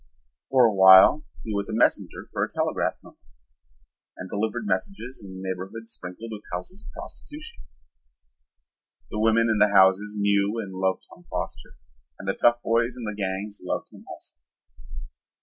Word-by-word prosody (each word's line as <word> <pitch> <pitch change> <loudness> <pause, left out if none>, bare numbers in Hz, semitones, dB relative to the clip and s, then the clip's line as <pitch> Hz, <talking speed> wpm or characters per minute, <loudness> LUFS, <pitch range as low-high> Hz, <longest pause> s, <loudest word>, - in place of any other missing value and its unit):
For 130 -2 +5
a 110 - +3
while 95 +9 +8 0.2
he 110 - -4
was 100 -1 -2
a 110 - -3
messenger 115 - +1
for - - 0
a - - -2
telegraph - - -1
company - - -17 1.0
and 90 - -7
delivered 110 +3 -2
messages 120 - -3
in 100 - -10
a 95 - -9
neighborhood 95 +5 -6
sprinkled 110 +3 -8
with 105 -1 -7
houses 90 - -6
of - - -12
prostitution. 305 +11 -10 1.5
The 105 - -3
women 115 +1 +3
in 110 -2 +1
the 105 - +6
houses 95 +2 +4
knew 100 +1 +1
and 100 -4 -5
loved 95 0 -1
Tom - - -17
Foster - - -5 0.4
and 95 - -10
the 95 - +1
tough 120 +2 +2
boys 115 +2 +1
in 120 - -7
the 105 -1 -3
gangs 100 +1 -4
loved 90 - -4
him - - -14
also. - - -12
105 Hz, 165 wpm, -25 LUFS, 95-115 Hz, 1.5 s, while